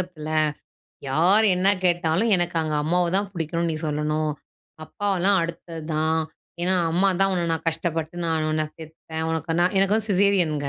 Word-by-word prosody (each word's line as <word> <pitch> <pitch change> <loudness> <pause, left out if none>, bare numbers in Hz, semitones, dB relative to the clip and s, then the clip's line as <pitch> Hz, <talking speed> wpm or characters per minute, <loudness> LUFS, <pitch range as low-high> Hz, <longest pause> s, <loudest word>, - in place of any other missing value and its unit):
உலகத்தில. 170 -4 -7 0.8
யார் 180 +10 +4
என்ன 185 +2 +1 0.2
கேட்டாலும் 175 +4 +2
எனக்கு 175 -1 -1
அங்க 155 -1 -2
அம்மாவதான் 180 +5 +1
பிடிக்கும்னு 170 -1 -2
நீ 160 - -2
சொல்லணும். 150 +1 -1 0.5
அப்பாவெல்லாம் 195 +2 +1
அடுத்தது 165 0 -6
தான். 160 +1 +1 0.4
ஏன்னா 185 +2 +2 0.2
அம்மாதான் 195 +2 +2
உன்ன 175 -2 -1
நான் 165 0 -3
கஷ்டப்பட்டு 165 0 -3
நானு 160 -1 0
உன்ன 155 0 0
பெத்தேன். 160 0 -7
உனக்கு 160 0 -2
நான் 180 +3 +2
எனக்கு 195 +1 +3
வந்து 220 0 -1
சிசேரியன்ங்க. 180 -7 +2
170 Hz, 145 wpm, -23 LUFS, 160-185 Hz, 0.8 s, யார்